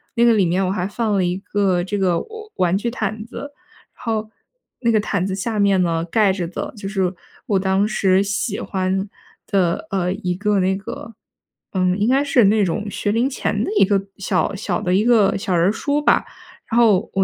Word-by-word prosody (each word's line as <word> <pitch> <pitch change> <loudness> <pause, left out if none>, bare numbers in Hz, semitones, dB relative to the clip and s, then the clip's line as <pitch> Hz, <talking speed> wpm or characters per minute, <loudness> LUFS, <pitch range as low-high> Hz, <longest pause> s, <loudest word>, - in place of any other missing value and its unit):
那 235 - +3
个 235 - +6
里 200 -4 +3
面 185 +3 +1
我 185 - 0
还 185 -1 -1
放 215 0 -1
了 190 - +2
一 175 +1 0
个 195 -3 0
这 205 +2 -3
个 180 -3 +2
我 440 -1 -9
玩 180 -1 +1
具 235 +3 -2
毯 215 -2 -3
子， 280 +4 -8 0.4
然 - - -14
后 220 -1 -2 0.5
那 235 -2 +2
个 215 - +3
毯 200 -3 -1
子 190 - -2
下 215 +2 -2
面 200 -2 +3
呢， 165 -1 0
盖 200 +2 +2
着 180 -3 -3
的 175 - -5
就 195 - -6
是 190 -2 0 0.3
我 200 -5 +2
当 190 +1 +1
时 195 -2 +2
喜 205 +1 -2
欢 190 +1 -2 0.4
的， 190 -1 0
呃， 180 -1 0
一 180 -2 -2
个 205 0 +1
那 190 +1 +1
个 220 +3 -8 0.6
嗯， 185 0 +1
应 210 - +2
该 270 +2 +3
是 255 -6 +4
那 210 +1 +4
种 205 +4 -2
学 205 +1 -2
龄 240 +5 +1
前 275 - -2
的 - - -3
一 - - +5
个 195 0 +1 0.2
小 200 +1 0
小 195 -3 -2
的 180 - 0
一 205 - +3
个 225 -5 +4
小 190 -1 -2
人 170 +1 +3
儿 - - +2
书 285 +6 -1
吧。 - - +3 0.5
然 230 - +1
后 215 -6 +5
我 195 - +2
200 Hz, 235 characters per minute, -20 LUFS, 185-220 Hz, 0.6 s, 个